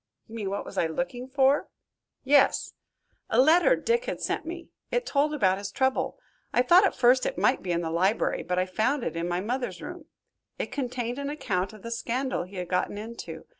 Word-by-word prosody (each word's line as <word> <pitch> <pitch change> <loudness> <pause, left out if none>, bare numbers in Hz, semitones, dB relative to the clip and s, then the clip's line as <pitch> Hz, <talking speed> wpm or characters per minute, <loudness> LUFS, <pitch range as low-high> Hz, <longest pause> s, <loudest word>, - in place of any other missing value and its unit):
"You 225 - -14
mean 210 -4 -3
what 200 - -3
was - - -4
I 165 - +2
looking 250 +8 -4
for?" 270 +1 +3 0.6
"Yes." 280 +1 +3 0.6
"A 225 - +2
letter 335 - +6
Dick 475 +1 0
had - - -3
sent - - -2
me. 340 0 -7 0.2
It - - 0
told 290 +1 +1
about 195 -10 +2
his 200 0 -5
trouble. 265 - 0 0.3
I 245 - +3
thought 350 +9 +6
at - - -4
first 250 +1 +4
it - - -4
might 260 - +2
be 180 - -3
in 170 0 +1
the 165 -1 -3
library, 190 +6 +1
but 180 +1 -2
I 185 - +2
found 225 +9 0
it - - -3
in 165 +1 -2
my 175 +1 -1
mother's 235 -3 -3
room. 350 -3 -8 0.5
It - - -4
contained 245 -2 -3
an 280 0 -3
account 200 -11 -2
of 215 -2 -14
the 230 - -6
scandal 245 -2 -2
he 190 +2 -14
had 180 -1 -4
gotten 180 +3 -1
into. 210 -7 -8
245 Hz, 210 wpm, -27 LUFS, 190-280 Hz, 0.6 s, letter